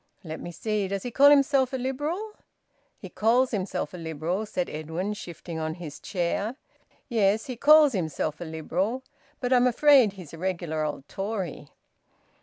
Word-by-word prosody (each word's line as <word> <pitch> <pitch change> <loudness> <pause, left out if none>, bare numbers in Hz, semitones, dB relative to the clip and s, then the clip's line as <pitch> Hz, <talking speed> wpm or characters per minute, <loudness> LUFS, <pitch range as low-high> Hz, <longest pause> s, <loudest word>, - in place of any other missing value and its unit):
"Let 160 -2 -6
me 175 - -6
see, 210 +3 -2
does 195 0 -3
he 245 - -4
call 280 +4 +7
himself 275 -2 +4
a - - 0
Liberal?" 295 - -3 0.6
"He - - -9
calls 245 +4 +2
himself 195 -4 -3
a - - -6
Liberal," 165 +5 -3
said 180 -3 -2
Edwin, 160 +6 -4
shifting 170 -4 -7
on 160 0 -3
his 160 -4 -8
chair. 200 +5 -2 0.5
"Yes, 220 -3 +2
he 255 - -5
calls 300 +2 +6
himself 160 -4 -2
a - - -4
Liberal. 180 - -2 0.4
But 250 0 +1
I'm 250 0 +5
afraid 255 -4 +5
he's 180 -6 -11
a 165 - -9
regular 170 -4 -2
old 145 -2 -4
Tory." 195 -7 -4
195 Hz, 165 wpm, -26 LUFS, 165-250 Hz, 0.6 s, call